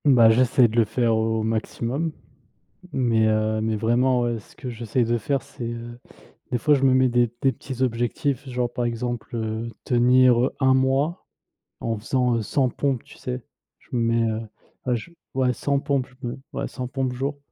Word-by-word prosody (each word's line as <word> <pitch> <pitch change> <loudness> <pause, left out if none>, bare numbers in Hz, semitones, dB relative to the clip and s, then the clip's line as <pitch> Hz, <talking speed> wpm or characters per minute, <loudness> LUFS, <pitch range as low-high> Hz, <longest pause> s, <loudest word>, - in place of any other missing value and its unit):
Bah 125 -6 +7
j'essaye 125 +1 +4
de 115 +1 -5
le 115 - +5
faire 115 +1 +1
au 110 0 0
maximum. 115 +7 -2 0.8
Mais 115 -4 +2
heu, 110 0 +1
mais 110 0 0
vraiment, 120 +3 +2
heu, 120 -1 -1
ce 105 - -16
que 130 - -6
j'essaye 115 +1 -1
de 120 +1 +1
faire 135 +4 -1
c'est, 120 - -9
heu, 120 0 -7 0.5
des 125 - +2
fois 150 +6 +4
je 135 - 0
me 130 -1 +5
mets 130 0 +4
des 120 0 +3 0.2
des 135 - +5
petits 130 -1 -6
objectifs. 130 +3 -1
Genre 125 -1 -1
par 120 - -2
exemple, 120 +1 -3
heu, 110 0 -3 0.2
tenir, 125 0 +5
heu, - - -1
1 130 -1 +5
mois 135 +6 +1 0.5
en 115 -1 -2
faisant, 125 +2 +1
heu, 115 - 0
100 130 +5 +1
pompes, 135 -1 -1
tu - - -15
sais? 125 -1 -5 0.4
Je - - -27
me 120 - +1
mets, 115 0 +2
heu, 110 0 -2 0.4
ouais 125 -1 +2
j 170 +9 -11 0.2
ouais, 130 -1 +2
100 140 +4 0
pompes, 140 -2 0
je - - -3
me 120 - -5 0.2
ouais - - -2
100 130 - -5
pompes 130 0 -2
jour. 135 +3 -3
120 Hz, 200 wpm, -24 LUFS, 115-130 Hz, 0.8 s, Bah